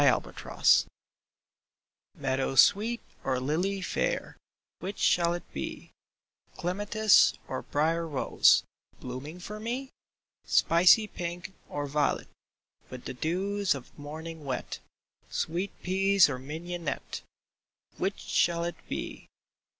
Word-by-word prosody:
CHOOSING - - +3 1.3
Meadow 135 0 -1
sweet 215 - +5 0.2
or 130 -1 0
lily 175 +9 -1
fair - - -1 0.2
— - - -65
Which 195 +3 -5
shall 170 0 +3
it 175 - -6
be? 70 - -6 0.7
Clematis 205 +4 +4
or 130 - -3
brier 165 +3 0
rose, 145 -4 +4 0.4
Blooming 130 +7 -7
for 210 +4 -7
me? 250 +4 -4 0.5
Spicy 180 +6 +5
pink, 175 -1 -6 0.2
or 145 0 -3
violet 145 +1 0 0.6
With 125 -1 -9
the - - -4
dews 190 +6 0
of 130 -3 -10
morning 155 +2 -8
wet, 135 -2 -4 0.5
Sweet 175 +5 -2
peas 195 -2 +4
or 130 - -4
mignonette 160 +2 -5 0.4
— - - -38
Which 195 +2 -1
shall 170 -1 +1
it 170 0 -3
be - - -5
170 Hz, 110 wpm, -29 LUFS, 145-195 Hz, 1.3 s, sweet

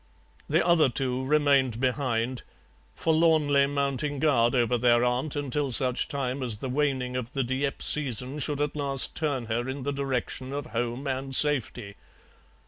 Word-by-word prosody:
The - - +2
other 170 -5 +4
two 130 +1 -2
remained 135 -4 +2
behind, 125 -2 -1 0.5
forlornly 155 - +2
mounting 140 0 -1
guard 130 -4 +2
over 125 0 +2
their 120 0 +3
aunt 125 +5 -1
until 145 -1 -2
such 125 0 +2
time 135 -1 -3
as 120 -4 -1
the 130 +4 -5
waning 130 -2 -1
of 125 -1 -5
the 135 - 0
Dieppe 130 +3 -2
season 135 -1 +1
should 145 0 -1
at 150 0 -2
last 140 -2 +1
turn 140 -6 -2
her 120 +3 -2
in 135 0 -5
the 140 +1 -2
direction 135 -1 -3
of 145 +1 -4
home 120 0 -4
and 135 0 -3
safety. 125 -8 0
135 Hz, 155 wpm, -26 LUFS, 125-145 Hz, 0.5 s, other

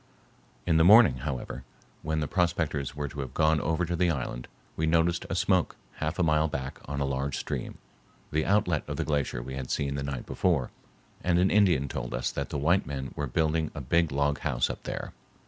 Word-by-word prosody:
In 80 -2 +3
the 80 - +5
morning, 100 - +7
however, 65 -1 -5 0.4
when 80 0 -1
the 75 - -1
prospectors 80 -6 0
were 75 0 -3
to 70 - -8
have 65 -2 -5
gone 80 -1 +3
over 80 +4 0
to 85 +1 -2
the 90 +1 +2
island, 60 -5 -3 0.3
we 80 - 0
noticed 85 +1 +2
a - - -1
smoke 90 -1 +2 0.2
half 80 +2 -2
a 90 - +2
mile 80 -1 +3
back 65 -3 -5
on 70 0 -4
a 70 - +1
large 70 0 -2
stream, - - -4 0.5
the 80 +1 +1
outlet 90 -5 +2
of - - -4
the - - -1
glacier 70 -5 -1
we 65 +1 -7
had 65 -1 -5
seen 70 -1 -1
the 70 - -3
night 70 -3 -4
before, 80 -9 0 0.5
and 90 -1 +2
an 90 +2 +3
Indian 90 -10 +4
told - - -4
us - - -1
that 70 0 -4
the 75 - -3
white 85 +7 +2
men 65 -2 -4
were 75 - -2
building 80 +3 0
a - - -4
big 85 +4 +2
log 70 0 +1
house - - 0
up - - -8
there. - - -5
75 Hz, 215 wpm, -28 LUFS, 70-85 Hz, 0.5 s, morning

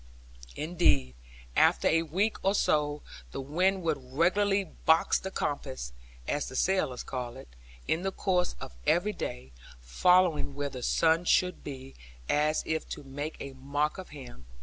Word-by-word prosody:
Indeed, 150 - +2 0.4
after - - +4
a 165 +1 +4
week 185 +7 0
or 195 +1 +3
so, 150 -5 +1 0.3
the - - -4
wind 180 +7 +1
would 160 -4 0
regularly 195 +6 +3
box 160 -1 +2
the 190 - -5
compass 135 - -3 0.3
(as 145 - -1
the - - -9
sailors 180 -8 +1
call 125 -2 -5
it) - - -11 0.4
in 160 - +1
the 195 +1 -1
course 180 -2 0
of - - -8
every 190 +5 +3
day, 65 - -6 0.3
following 160 - +3
where 145 0 -2
the 130 -2 -7
sun 165 +6 +3
should 180 +1 +2
be, 135 -2 -8 0.3
as 150 +1 +2
if 160 0 -2
to - - -6
make 145 +3 -5
a 140 - -6
mock 145 +5 -1
of 185 - -8
him. 125 - -11
155 Hz, 155 wpm, -29 LUFS, 135-180 Hz, 0.4 s, after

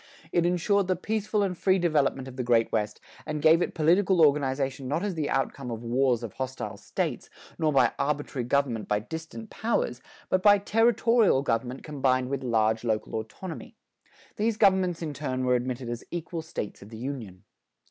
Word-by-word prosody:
It 170 0 +2
insured 185 +3 +1
the 185 - +2
peaceful 215 +2 -1
and 190 -2 -1
free 190 +2 +2
development 145 -6 +1
of 130 - -9
the 130 - -2
great 120 -2 +2
West 105 0 -1 0.2
and 155 -1 -4
gave 160 +3 +5
it - - -2
political 180 +4 +3
organization 135 -2 0
not 150 +7 -1
as 205 -2 -1
the 155 -3 -2
outcome 135 -1 -1
of 115 0 -5
wars 120 0 +1
of 115 - -6
hostile 130 0 -5
States, - - -3 0.3
nor 155 -2 +2
by 135 - +4
arbitrary 140 -3 -1
government 125 -4 0
by 105 - +2
distant 160 - -7
powers, 220 - -1 0.3
but 185 - +1
by 205 +1 +7
territorial 225 - +3
government 125 +1 -2
combined 130 -4 0
with 140 -1 -2
large 110 -2 +1
local 110 -2 -1
autonomy. 115 - -6 0.6
These 215 +1 0
governments 190 -4 +3
in 155 -2 -3
turn 130 -3 -3
were 125 - +3
admitted 125 0 -2
as 120 0 -5
equal 170 -1 -4
States 160 -10 -6
of 100 - -12
the 110 - -9
Union. 115 -7 -6
140 Hz, 180 wpm, -27 LUFS, 125-180 Hz, 0.6 s, by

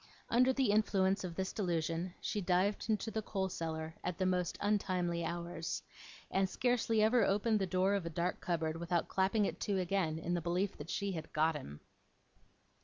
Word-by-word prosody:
Under 250 +2 +5
the 260 -5 +2
influence 195 -2 +2
of 175 -2 -5
this 190 +1 -2
delusion, 170 -2 -1
she 210 - -2
dived 185 +4 +1
into 220 +1 0
the 220 - -1
coal 195 -2 -2
cellar 160 -2 -4
at 180 - -2
the 185 - 0
most 180 -2 0
untimely 185 -4 0
hours, 170 0 -3 0.5
and 190 0 +2
scarcely 230 -2 +2
ever 225 +1 +4
opened 210 +2 +2
the 195 - 0
door 185 +2 +2
of 200 -2 0
a - - -2
dark 170 +2 -1
cupboard 165 -2 -1
without 170 0 0
clapping 195 +2 +2
it - - -3
to 200 -2 0
again, 180 -3 0
in 165 +2 -2
the 175 - 0
belief 180 +4 0
that 150 +3 -8
she 200 +1 -1
had 160 -3 -6
got 160 +1 +2
him. 75 - -8
185 Hz, 185 wpm, -34 LUFS, 170-205 Hz, 0.5 s, Under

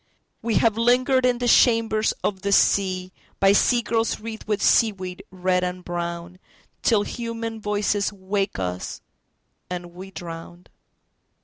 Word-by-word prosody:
We 230 -1 -1
have 225 +3 +3
lingered 250 +2 +3
in 245 -1 +1
the 245 0 -2
chambers 225 -2 +4
of 190 -2 -1
the 200 - -2
seaBy 190 0 +2
sea 240 +2 +3
girls 225 +1 0
wreathed 220 0 -8
with 210 -1 0
seaweed 195 -4 +1
red 180 0 0
and 180 0 -4
brownTill 175 +5 -3
human 230 -2 -5
voices 205 0 0
wake 195 0 -2
us, 90 -1 -4 0.7
and 175 -1 -6
we 185 +2 -9
drown. 175 -1 -9
200 Hz, 125 wpm, -23 LUFS, 180-225 Hz, 0.7 s, chambers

